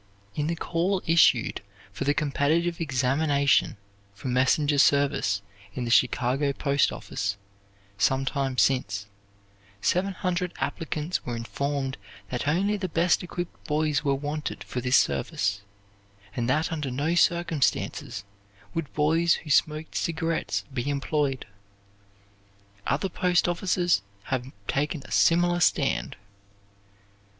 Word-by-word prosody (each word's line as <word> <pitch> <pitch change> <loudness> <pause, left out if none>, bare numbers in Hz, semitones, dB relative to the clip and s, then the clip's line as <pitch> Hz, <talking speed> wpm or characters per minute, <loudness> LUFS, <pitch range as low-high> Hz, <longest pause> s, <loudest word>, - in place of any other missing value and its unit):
In 150 0 -1
the 170 - -1
call 175 +4 -1
issued 160 -8 +4 0.3
for 140 - -4
the 145 +1 +2
competitive 160 +4 +1
examination 140 -1 +2 0.4
for 125 - -5
messenger 140 +3 +2
service 135 -9 +3 0.3
in 125 - -2
the 120 - -2
Chicago 130 +3 +2
Post 140 0 +1
office, 100 0 -3 0.6
sometime 135 +2 +1
since, 105 -8 +1 0.7
seven 190 - +1
hundred 180 -1 -2
applicants 160 0 -3
were 120 - -4
informed 135 +3 -3 0.3
that 125 +2 -2
only 195 +7 +2
the 190 -2 -3
best 170 +1 +2
equipped 175 0 -6
boys 150 -1 +1
were 140 -2 +2
wanted 150 +2 -4
for 125 - -4
this 125 +2 +4
service, 100 +8 0 0.7
and 120 0 -1
that 155 +6 +1
under 150 -4 -2
no 145 +6 -1
circumstances 170 - +1 0.5
would 165 -4 -3
boys 165 +3 +3
who 155 - -6
smoked 155 +2 +1
cigarettes 165 0 -1
be 130 +2 -2
employed. 140 -1 -1 1.4
Other 145 +7 +1
post 180 -1 +1
offices 175 - +1 0.2
have 130 0 -3 0.2
taken 145 +1 -1
a - - -13
similar 175 +1 +3
stand. 175 - +1
145 Hz, 120 wpm, -26 LUFS, 130-165 Hz, 1.4 s, issued